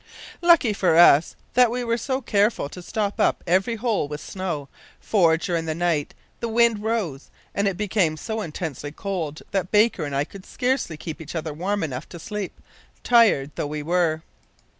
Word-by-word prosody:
"Lucky 335 -10 +5
for 180 -5 +2
us 165 -2 +6 0.2
that 250 -1 +5
we 245 +2 -2
were 230 -1 +1
so 260 +3 -2
careful 210 - +1
to 180 - -9
stop 205 +3 -3
up - - +2
every 190 +6 +2
hole 220 - 0
with 150 0 -6
snow, 170 -7 -4 0.3
for, 170 -6 +3
during 170 -1 -2
the 160 -1 -2
night 165 -4 -1 0.2
the 235 - -2
wind 230 -1 +3
rose 210 -11 -2 0.2
and 200 0 +1
it 195 -3 -1
became 190 -6 +1
so 220 +5 -4
intensely 155 -4 -5
cold 160 -4 -4
that 190 -2 -1
Baker 210 -4 +3
and 145 -2 -3
I 140 - +2
could 190 +5 -11
scarcely 250 - -1
keep 160 0 -7
each 160 +2 -8
other 160 -2 -3
warm 195 +6 -2
enough 135 -2 -5
to 175 - -9
sleep, 205 +2 -5 0.4
tired 220 - +4
though - - -3
we 150 0 -4
were. 165 -1 +1
185 Hz, 185 wpm, -24 LUFS, 160-220 Hz, 0.4 s, us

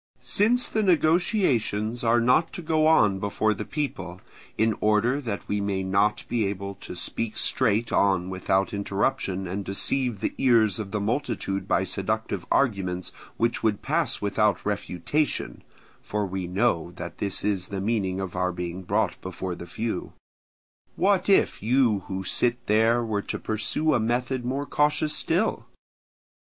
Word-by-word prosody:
Since 240 +5 +3
the 220 - 0
negotiations 155 - +2
are 120 +1 +4
not 125 +8 +3
to 175 - -6
go 155 0 +2
on 105 -11 +4
before 105 +2 +1
the 105 +1 -5
people, 140 - -4 0.4
in 110 -1 +2
order 110 +6 +2
that 110 -6 -5
we 105 0 -1
may 100 -1 -1
not 100 +3 +1
be 115 -4 0
able 100 0 -4
to - - -8
speak 115 -1 -3
straight 115 -2 +1
on 95 -3 +2
without 95 +1 0
interruption, 100 -1 -1
and 95 +3 -3
deceive 115 +4 -1
the - - -2
ears 110 -6 +4
of 105 -2 -4
the 105 - -2
multitude 100 -3 -2
by - - +2
seductive - - -2
arguments 95 -8 0 0.3
which 115 +1 0
would 110 -3 0
pass 155 +2 0
without 105 +1 +1
refutation 100 - -2 0.4
(for 105 0 -2
we 95 -1 -4
know 90 -3 +1
that 85 0 -8
this 100 -2 -2
is 95 -3 -1
the 100 - -4
meaning 95 -3 -1
of 95 -2 -5
our 90 0 0
being 90 +1 -5
brought 90 - -1
before 95 0 -5
the 85 - -8
few), 110 +5 -4 0.8
what 195 0 +2
if 195 - +3
you 115 -2 +3
who 95 0 -4
sit 120 +5 0
there 115 +3 +3
were 105 -2 -1
to - - -4
pursue 110 +9 -1
a 125 - +3
method 125 +3 -1
more 135 +4 -2
cautious 150 +1 +1
still? - - 0
105 Hz, 155 wpm, -26 LUFS, 95-125 Hz, 0.8 s, are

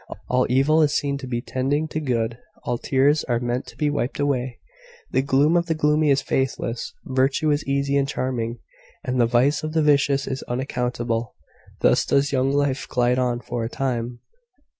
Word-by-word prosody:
All 125 0 +3
evil 135 +5 +4
is 150 -1 +2
seen 140 -1 -2
to 130 - -7
be 120 -1 -2
tending 140 +4 -1
to 155 - -3
good; 120 -5 -1 0.2
all 120 -1 -2
tears 145 +3 +2
are 120 -2 0
meant 120 +1 -2
to - - -13
be 150 -2 +1
wiped 140 -2 -2
away; 130 -3 -1 0.5
the - - +2
gloom 140 +4 +3
of 170 -1 +2
the 160 - 0
gloomy 150 0 +2
is 135 -1 +3
faithless; 130 -3 -2
virtue 135 +3 +1
is 145 +1 0
easy 140 0 +1
and 140 -1 +1
charming; 120 -4 -2 0.5
and 125 -1 0
the 120 - +4
vice 130 +5 +2
of 155 0 -4
the 160 -1 +2
vicious 140 -2 +3
is 130 0 -4
unaccountable. 120 -2 -2 0.5
Thus - - +4
does 140 +1 +1
young 135 0 +1
life 140 -1 0
glide 125 0 +1
on 120 -1 0
for 120 -1 -4
a 115 - -3
time. 120 -2 -3
135 Hz, 185 wpm, -23 LUFS, 125-145 Hz, 0.5 s, evil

